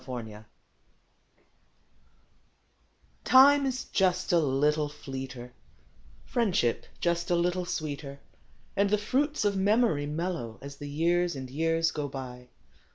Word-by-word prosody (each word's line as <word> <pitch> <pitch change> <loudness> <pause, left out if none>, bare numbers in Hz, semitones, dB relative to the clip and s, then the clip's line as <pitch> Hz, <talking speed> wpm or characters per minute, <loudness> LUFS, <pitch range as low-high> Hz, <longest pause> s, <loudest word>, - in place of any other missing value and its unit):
A597234 115 -5 -7 2.9
IME 280 +2 +8
is 255 -1 -3
"just 185 -1 +1
a 170 - +5
little 150 +1 +1
fleeter; 130 -3 -8 0.7
priendship 190 - +1
just 170 0 0
a 175 - +3
little 175 +1 0
sweeter; 145 -4 -5 0.6
And 200 0 +2
the 210 - +3
jruits 265 +5 0
of 205 - +3
memoru 195 -6 +2
mellcrcO 155 -8 -3
' - - -31
I - - -8
As 140 0 -9
the 145 0 -7
Ljears 175 0 +2
and 130 -1 -6
Ejears 165 +3 0
ao 145 -1 -2
btj. 125 -2 -8
165 Hz, 125 wpm, -28 LUFS, 135-190 Hz, 2.9 s, IME